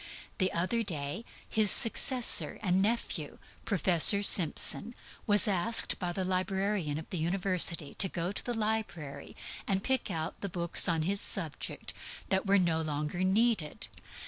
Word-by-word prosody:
Recently 185 -3 -2 0.2
his 215 -2 +1
successor 245 +3 +4
and 185 -1 +1
nephew, 230 +4 -2 0.3
Professor 195 0 +5
Simpson, 200 +5 +3 0.3
was 210 +1 +6
asked 205 +4 +2
by 180 -2 -3
the 185 +1 -4
librarian 185 -3 -2
of 160 - -9
the 180 - -3
University 175 -3 -1
to 190 - +2
go 175 +2 -4
to - - -4
the 245 - -4
library 210 -10 -5 0.3
and 195 0 -1
pick 265 -4 -1
out 165 -1 -5
the 200 - -5
books 170 0 0
on 165 -2 -1
his 195 +4 -1
subject 165 -7 -3
(midwifery) - - -14
that 190 +1 0
were 200 +1 +4
no 170 -3 0
longer 150 +3 -4
needed. 200 -4 -1
185 Hz, 145 wpm, -29 LUFS, 170-210 Hz, 0.3 s, was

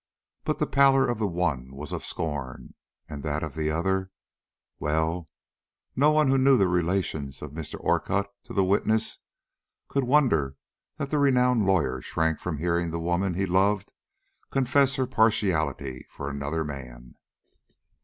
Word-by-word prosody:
But - - 0
the - - +1
pallor 135 -1 +4
of 120 -2 -2
the 105 - +1
one 75 -8 -2
was 70 +1 -7
of - - -4
scorn, 70 -5 -4 0.3
and 70 -1 -7
that 75 +1 -2
of 80 -3 -4
the 80 -1 -1
other 95 +4 0 0.7
Well, 80 +3 -1 0.7
no 145 +3 +4
one 155 -1 +3
who 135 0 +3
knew 135 0 +5
the 95 - +3
relations 85 -6 -1
of 75 - -7
Mr. 80 0 -6
Orcutt 100 +1 +1 0.2
to - - -9
the 100 - +3
witness 110 +3 +1 0.7
could 140 - 0
wonder 120 - +2 0.4
that 140 - -4
the 150 - +2
renowned 125 -6 +3
lawyer 70 -9 +1
shrank 80 +3 -1
from 85 -4 -3
hearing 85 +2 0
the 85 +1 -3
woman 85 +2 0
he 95 +2 0
loved 95 +2 +1 0.6
confess 135 0 +2
her 130 - 0
partiality 90 - 0
for 70 0 -6
another 70 +3 -2
man. 60 -4 -8
90 Hz, 155 wpm, -26 LUFS, 75-115 Hz, 0.7 s, knew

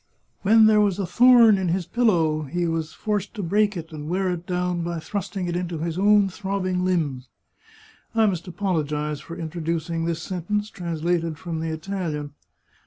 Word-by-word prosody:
'* - - -44
When 220 +2 +6
there 215 -1 +5
was 200 -3 +2
a 200 - -1
thorn 230 +2 +6
in 185 - -1
his 175 +1 0
pillow 170 -8 +2
he 170 +4 -2
was 165 -1 -2
forced 210 +2 -3
to 205 - -4
break 205 +3 +1
it 165 0 -7
and 150 -1 -7
wear 185 +1 0
it 175 0 -5
down 180 -1 -1
by 170 0 -3
thrusting 195 +1 -4
it 175 - -2
into 175 -1 -3
his 165 +1 -3
own 205 +1 +4
throbbing 190 -1 -2
limbs." 150 -9 -1 0.9
I 225 -1 +4
must 185 -4 -1
apologize 150 -6 -2
for 165 +3 -9
introducing 165 0 -3
this 170 -1 -1
sentence, 205 +4 -3
translated 170 -2 -2
from 165 -1 -5
the 160 0 -2
Italian. 160 -3 -4
175 Hz, 175 wpm, -24 LUFS, 165-195 Hz, 0.9 s, When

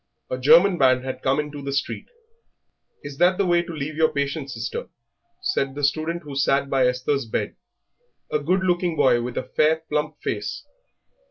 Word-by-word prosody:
A 130 - -1
German 170 +7 +6
band 130 -1 +4
had 130 - -5
come 135 +2 +1
into 150 -1 -4
the 140 0 -4
street. 140 +1 -3 1.0
"Is 145 -1 -8
that 180 +1 +4
the 200 - +2
way 175 -1 +3
to 170 - -8
leave 155 -1 -5
your 160 0 +3
patient, 140 0 -2
sister?" 475 - -5 0.5
said 135 - -1
the 145 - -5
student 160 +4 0
who 145 -2 -8
sat 140 0 +1
by 130 -2 +3
Esther's 125 +1 -1
bed, - - -2 0.8
a 150 - +1
good 180 +6 +1
looking 175 -2 +1
boy 120 -5 +3
with 120 0 -5
a - - -1
fair, 160 +1 +1
plump 150 +1 -1
face. - - -3
150 Hz, 180 wpm, -23 LUFS, 135-170 Hz, 1.0 s, German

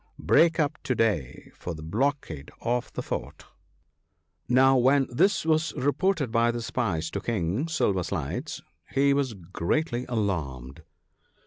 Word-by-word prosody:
" - - -40
Break 165 0 +4
up 150 0 0
to 130 - -1
day 100 - -1
for 85 - -6
the 80 - -9
blockade 105 - -2
of 120 +1 -1
the - - -4
fort." - - -5 1.0
Now, 130 +2 +5
when 135 +2 +4
this 195 +9 +2
was 160 0 +2
reported 145 +1 +1
by 115 0 +3
the 120 0 -2
spies 90 -10 -1
to 100 - -3
King 105 - -1
Silver 105 - +1
sides, 75 -4 -4 0.3
he 140 +1 +3
was 135 -5 0
greatly 120 - -2
alarmed. 80 - -3
120 Hz, 140 wpm, -27 LUFS, 85-140 Hz, 1.0 s, Now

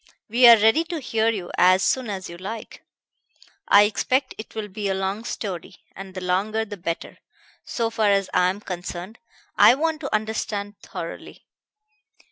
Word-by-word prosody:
We 240 +3 +6
are 235 -1 +10
ready 225 +9 +4
to 335 -1 -4
hear 225 -4 0
you 195 -6 -4
as 185 +1 +5
soon 255 -4 0
as 190 -2 -5
you 170 - -9
like. 205 +5 -8 0.9
I 205 - +7
expect 260 +5 0
it 220 - -9
will 215 -1 -4
be 200 0 -4
a 190 - 0
long 195 +3 -3
story, 190 -6 -5 0.2
and 195 -1 -10
the 185 - -5
longer 200 +5 0
the 205 -1 -7
better, 170 -3 -5 0.5
so 230 -1 -2
far 220 -2 +1
as 195 -1 +2
I 180 0 +3
am 195 +3 -5
concerned; 180 +2 -7 0.4
I 245 - +8
want 320 +2 -1
to 280 - -5
understand 210 -1 -3
thoroughly. - - -8
210 Hz, 170 wpm, -23 LUFS, 190-225 Hz, 0.9 s, are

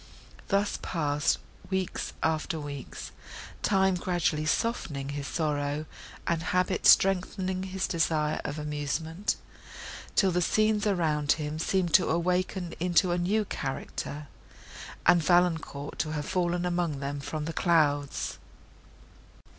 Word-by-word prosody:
Thus 200 +1 +1
passed 150 -4 +1 0.3
weeks 190 -1 -2
after 160 +1 0
weeks, 145 -2 -7 0.5
time 190 -1 +3
gradually 175 -4 0
softening 155 - -1
his 140 -1 -4
sorrow, 150 -1 -1 0.4
and 170 -1 0
habit 180 +2 +1
strengthening 190 0 +4
his 190 0 -2
desire 155 -2 0
of 145 - -4
amusement, 150 +5 -2 0.8
till 195 -3 +4
the 180 +1 +1
scenes 215 +4 +2
around 155 -7 +2
him 150 0 -4
seemed 175 0 0
to 180 - +5
awaken 180 +1 0
into 180 +1 +3
a 175 - +1
new 205 +5 +1
character, 145 -1 -4 0.8
and 175 0 +6
Valancourt, 165 -4 +1
to 155 - -1
have 150 -1 -3
fallen 175 -1 0
among 175 -5 0
them 140 +1 -3
from 150 +2 -4
the 165 - -4
clouds. 145 -5 +1
170 Hz, 120 wpm, -28 LUFS, 150-185 Hz, 0.8 s, and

